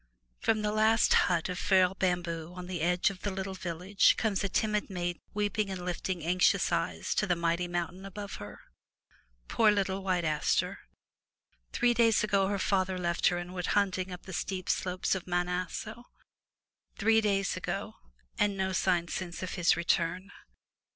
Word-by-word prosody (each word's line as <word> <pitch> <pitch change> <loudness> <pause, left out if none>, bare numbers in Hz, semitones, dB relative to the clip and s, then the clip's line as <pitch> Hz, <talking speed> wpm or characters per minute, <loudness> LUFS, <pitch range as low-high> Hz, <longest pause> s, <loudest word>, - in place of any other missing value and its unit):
From 215 -1 +1
the 210 - +1
last 220 +1 +4
hut 175 -2 +3
of 180 0 -4
frail 185 -1 +3
bamboo 175 -3 -2
on 180 -1 -7
the 180 -3 -4
edge 180 +3 +2
of 190 - -11
the 205 - -2
little 190 0 -4
village 180 +2 +2
comes 210 -3 0
a 200 - 0
timid 210 +2 0
maiden 175 -2 -3
weeping 210 0 0
and 185 -2 -5
lifting 180 -1 -3
anxious 180 +2 +2
eyes - - -1
to 210 - 0
the 175 - +2
mighty 170 +1 0
mountain 175 +2 -3
above 200 +1 -7
her. 105 - -10 0.9
Poor 220 -2 +4
little 195 -2 0
White 180 -3 0
Aster! 155 -1 0 0.9
Three 245 0 +2
days 230 -3 +3
ago 200 -2 +2
her 200 0 -1
father 190 -1 0
left 170 -1 +1
her 175 - +2
and 175 +1 -6
went 180 -1 -3
hunting 190 -2 0
up 180 - -8
the 190 - -9
steep 185 +1 -3
slopes 180 0 0
of 190 -2 -4
Mt. 175 0 0
Aso 210 +6 -4 0.5
— - - -49
three 225 +1 +4
days 195 -2 +1
ago, - - -4 0.4
and 205 -1 +2
no 190 0 0
sign 180 -2 +1
since 175 0 -5
of 185 - -4
his 175 -2 +3
return. 175 +3 0
185 Hz, 175 wpm, -30 LUFS, 175-200 Hz, 0.9 s, last